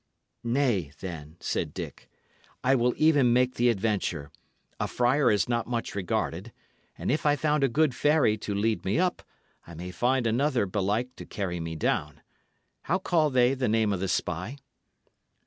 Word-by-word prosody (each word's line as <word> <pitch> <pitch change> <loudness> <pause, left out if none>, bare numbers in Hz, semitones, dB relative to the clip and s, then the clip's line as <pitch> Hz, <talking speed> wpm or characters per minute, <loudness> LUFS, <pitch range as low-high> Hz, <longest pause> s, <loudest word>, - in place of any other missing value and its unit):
"Nay, 120 - +1
then," 80 -4 -7
said - - -3
Dick, - - -7 0.5
"I 130 +1 +4
will 125 -1 +2
even 145 -6 +4
make 125 +1 +3
the 120 +1 +2
adventure. 100 -9 -1 0.5
A - - 0
friar 125 +4 +2
is 105 - +2
not 120 -1 -1
much 120 -1 -3
regarded; 95 +1 -2 0.5
and - - -1
if 150 - 0
I 145 -1 +4
found 150 0 +1
a 135 - +3
good 150 +2 +2
fairy 145 -5 +3
to 105 -1 -4
lead 110 +2 0
me 95 +6 0
up, 180 +1 +1 0.5
I 85 - -10
may 90 +3 -6
find 125 +7 +1
another 120 0 +1
belike 105 +6 -1
to - - -8
carry 90 -4 -3
me 80 0 -4
down. 80 - -1 0.6
How 180 - +2
call 170 -5 +2
they 125 -1 +3
the 130 -4 -1
name 110 -1 +2
of 95 - -2
this 95 0 0
spy?" 90 - -3
120 Hz, 170 wpm, -27 LUFS, 95-135 Hz, 0.6 s, I